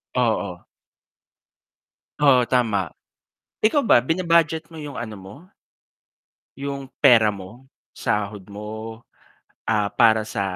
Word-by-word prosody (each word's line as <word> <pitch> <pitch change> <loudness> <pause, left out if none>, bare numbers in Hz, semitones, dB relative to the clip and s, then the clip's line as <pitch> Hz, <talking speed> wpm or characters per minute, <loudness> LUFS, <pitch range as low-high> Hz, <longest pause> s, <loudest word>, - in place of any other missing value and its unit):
Oo. 110 -7 -1 1.5
Oo, 140 -4 +5
tama. 110 - +1 0.7
Ikaw 275 +7 +3
ba 120 - +5
bina-budget 165 +1 +1
mo 160 - -8
'yong 145 -3 -7
ano 110 -2 -6
mo, 95 +1 -12 1.3
'yong 140 -1 -4 0.2
pera 115 -6 +6
mo? 100 +6 -11 0.3
Sahod 105 -1 -2
mo, 110 +2 -7 0.7
ah, 105 -2 +1
para 110 -2 +4
sa, 105 -2 -4
115 Hz, 100 wpm, -22 LUFS, 105-140 Hz, 1.5 s, pera